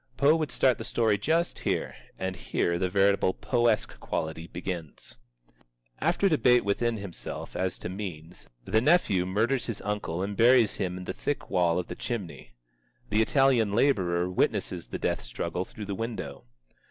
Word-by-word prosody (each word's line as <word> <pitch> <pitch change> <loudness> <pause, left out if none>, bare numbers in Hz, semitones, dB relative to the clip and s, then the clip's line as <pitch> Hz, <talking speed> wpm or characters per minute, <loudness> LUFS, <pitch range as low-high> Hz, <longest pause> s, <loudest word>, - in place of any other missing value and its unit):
Poe 145 +3 +5
would 155 -3 -1
start 125 0 +2
the - - -4
story 110 -3 +2
just 165 - 0
here, - - -1 0.2
and 95 0 -3
here 85 -1 -1
the 90 - 0
veritable 100 0 +3
Poe 120 +3 +1
esque 110 -2 0
quality 80 0 -4
begins. 85 -8 -6 0.8
After 170 +6 +2
debate 125 - +4
within 115 +3 0
himself 100 -4 -7
as 95 0 -1
to - - -6
means, 90 -3 -7 0.2
the 110 - +2
nephew 120 - +3
murders 110 +7 0
his 115 -4 -3
uncle 105 -4 -2
and 100 +1 -3
buries 120 -1 +5
him 90 -1 -2
in 90 - -7
the 95 - -4
thick 145 - -3
wall 90 -3 +2
of 90 - -1
the - - -6
chimney. 95 - -6 0.6
The 105 +1 +3
Italian 120 -4 +3
laborer 95 -8 +2
witnesses 90 - -1
the - - -5
death - - -1
struggle 85 +9 -4
through 105 - -8
the 100 - -4
window. 100 - -5
100 Hz, 165 wpm, -28 LUFS, 90-120 Hz, 0.8 s, Poe